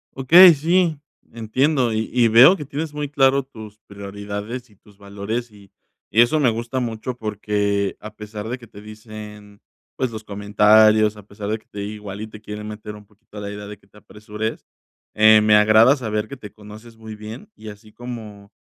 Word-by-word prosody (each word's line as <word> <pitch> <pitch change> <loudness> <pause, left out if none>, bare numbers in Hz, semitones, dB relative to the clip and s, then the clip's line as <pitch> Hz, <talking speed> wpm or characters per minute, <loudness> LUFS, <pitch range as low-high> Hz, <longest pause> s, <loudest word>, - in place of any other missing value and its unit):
Okey, 170 +7 +8
sí, 165 +1 +1 0.3
entiendo, 125 +3 0
y 110 0 -2
y 120 -2 +4
veo 125 - +7
que 150 - -8
tienes 150 +2 -5
muy 150 -1 -4
claro 135 -1 +3
tus 110 -5 -13
prioridades 100 +4 -7
y 105 - -23
tus 100 +1 -23
valores, 100 +4 -5
y 100 -2 -19 0.4
y 115 - +5
eso 135 +6 +3
me 130 -5 +3
gusta 120 +3 -4
mucho, 120 +1 -5
porque 105 -2 -2
a 105 0 -10
pesar 105 0 -8
de 125 +2 -5
que 120 - -14
te 100 -2 -14
dicen, 105 -1 -12 0.4
pues, 130 -2 -2
los 110 0 -8
comentarios, 105 +1 +3
a 105 - -12
pesar 100 0 -8
de 110 - -1
que 110 - -25
te 100 - -9
igual 105 -1 -7
y 110 - -6
te 105 -1 -13
quieren 105 0 -8
meter 105 0 -8
un 105 -1 -14
poquito 105 +1 -18
a - - -5
la 100 - -6
idea 105 0 -8
de 105 -1 -10
que - - -28
te - - -22
apresures, 105 +1 -7 0.5
eh, 110 0 +6
me 105 0 +4
agrada 110 +5 +5
saber 110 -5 -3
que 140 - -9
te 105 -4 -12
conoces 110 +2 -14
muy 110 -1 -10
bien, 110 - -10
y 110 - -10
así 105 +1 -14
como, 110 -4 -10
110 Hz, 200 wpm, -21 LUFS, 105-120 Hz, 0.5 s, Okey